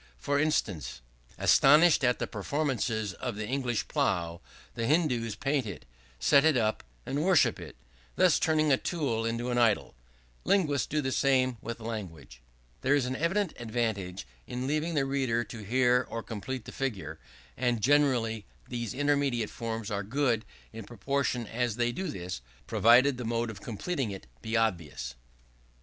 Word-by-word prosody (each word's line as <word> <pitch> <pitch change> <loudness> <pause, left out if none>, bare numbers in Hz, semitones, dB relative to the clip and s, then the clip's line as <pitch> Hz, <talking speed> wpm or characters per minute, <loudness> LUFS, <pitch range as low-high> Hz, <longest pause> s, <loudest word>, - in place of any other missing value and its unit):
For 140 - 0
instance: 100 - -1 0.4
"Astonished 150 +2 +6
at 125 -1 +3
the - - -2
performances 115 -3 -2
of 125 -1 -5
the 105 0 -4
English 125 -3 -1
plow, 85 -1 -1 0.3
the 115 -1 -2
Hindoos 125 -9 +1
paint 135 -4 -1
it, 100 - -7 0.3
set 140 - +5
it 155 -4 +4
up, 110 -2 0 0.2
and 145 +3 -1
worship 185 -4 +4
it; - - -9 0.4
thus - - +4
turning 155 -1 +2
a 135 - +5
tool 130 -11 -1
into 120 +2 -2
an 120 - +1
idol: 115 -3 +2 0.5
linguists 145 - +2
do 150 +1 0
the 130 -2 -2
same 130 -2 +2
with 115 0 -6
language." 80 - -7 0.4
There 140 +2 +3
is 140 -3 +1
an 130 +1 -2
evident 175 +4 0
advantage 110 - -2 0.2
in 125 +1 -4
leaving 155 +4 -1
the 140 -2 +2
reader 130 -4 0
or - - -7
hearer 125 +4 +2
to 115 -1 -5
complete 120 +3 -5
the - - -8
figure. 95 - -4 0.4
And 120 -2 0
generally 125 -5 +2 0.2
these 120 0 -4
intermediate 140 -5 +1
forms 115 -2 -4
are 100 -1 -1
good 115 +1 0 0.3
in 110 0 -7
proportion 125 +3 -2
as 120 0 -1
they 120 0 +1
do 190 +9 -4
this; 90 - -5 0.2
provided 125 +4 +5
the 125 - -5
mode 115 0 -1
of 105 - -11
completing 130 - -3
it 95 -6 -7 0.2
be 110 +1 -1
obvious. 75 - -1
120 Hz, 160 wpm, -29 LUFS, 110-140 Hz, 0.5 s, Astonished